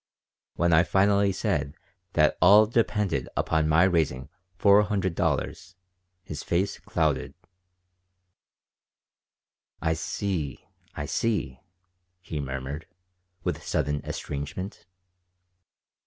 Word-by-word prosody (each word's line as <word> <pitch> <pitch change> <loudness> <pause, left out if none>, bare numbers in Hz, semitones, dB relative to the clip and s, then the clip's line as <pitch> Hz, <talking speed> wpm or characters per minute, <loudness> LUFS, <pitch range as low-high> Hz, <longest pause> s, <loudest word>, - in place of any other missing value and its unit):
When 85 0 +2
I 80 - +7
finally 100 +3 +3
said 85 -8 -1 0.4
that 75 -1 +3
all 100 +5 +8
depended 105 - 0
upon 80 -1 +1
my 80 +3 +5
raising 80 -8 +1 0.3
four 100 +1 +6
hundred 100 -4 -1
dollars 90 +2 -2 0.5
his 75 -6 -6
face 95 +4 -1
clouded 75 -6 -1 2.4
"I 80 - +1
see, 80 -2 -3 0.3
I - - -4
see," 105 - -1 0.6
he 85 -4 -5
murmured, 70 +2 -5 0.6
with - - -2
sudden 75 0 -1
estrangement. 75 +9 -6
85 Hz, 95 wpm, -26 LUFS, 75-100 Hz, 2.4 s, all